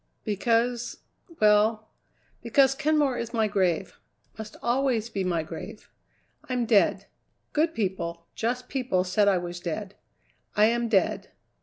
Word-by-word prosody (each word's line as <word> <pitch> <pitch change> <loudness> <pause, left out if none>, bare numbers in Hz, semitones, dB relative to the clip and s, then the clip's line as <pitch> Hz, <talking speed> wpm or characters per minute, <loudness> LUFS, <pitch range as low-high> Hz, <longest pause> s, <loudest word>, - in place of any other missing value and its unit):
"Because 230 +3 0 0.4
well, 215 +1 +3 0.5
because 265 +3 +4
Kenmore 295 -2 +1
is 235 0 -5
my 220 -1 +2
grave 190 -3 -1 0.4
must 220 -1 -9
always 240 -2 0
be 195 - -2
my 170 -3 0
grave. - - -9 0.6
I'm 250 -2 0
dead. 215 -3 +3 0.5
Good 320 +2 +1
people, 170 -5 -3
just 250 +2 -2
people 250 -9 0
said 200 +3 +2
I 195 -2 +4
was 175 0 -5
dead. 190 +3 -5 0.6
I 210 - +5
am 235 +1 +1
dead. 195 -4 +1
220 Hz, 130 wpm, -26 LUFS, 190-245 Hz, 0.6 s, I